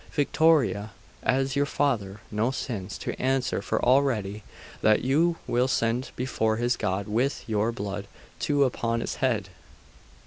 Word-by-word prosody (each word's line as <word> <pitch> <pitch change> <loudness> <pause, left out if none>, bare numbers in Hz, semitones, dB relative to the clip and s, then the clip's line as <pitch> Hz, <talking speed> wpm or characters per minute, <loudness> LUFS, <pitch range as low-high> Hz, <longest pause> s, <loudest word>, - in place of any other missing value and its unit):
Victoria! 145 -8 +3 0.3
has 135 +1 +1
your 140 0 +2
father 110 -10 -1
no 110 +3 +1
sins 115 -8 -4
to - - -4
answer 130 0 +1
for - - -1
already, 120 -7 +2 0.4
that 110 0 +4
you 160 +6 +3
will 125 +2 +2
send 120 0 0
before 110 -4 0
his 120 +1 +1
God 95 +2 -2
with 120 +7 0
your 110 +1 +1
blood 100 -4 -5 0.3
too 145 -1 +2
upon 115 -3 0
his - - -4
head? 110 -8 0
120 Hz, 140 wpm, -27 LUFS, 105-135 Hz, 0.4 s, that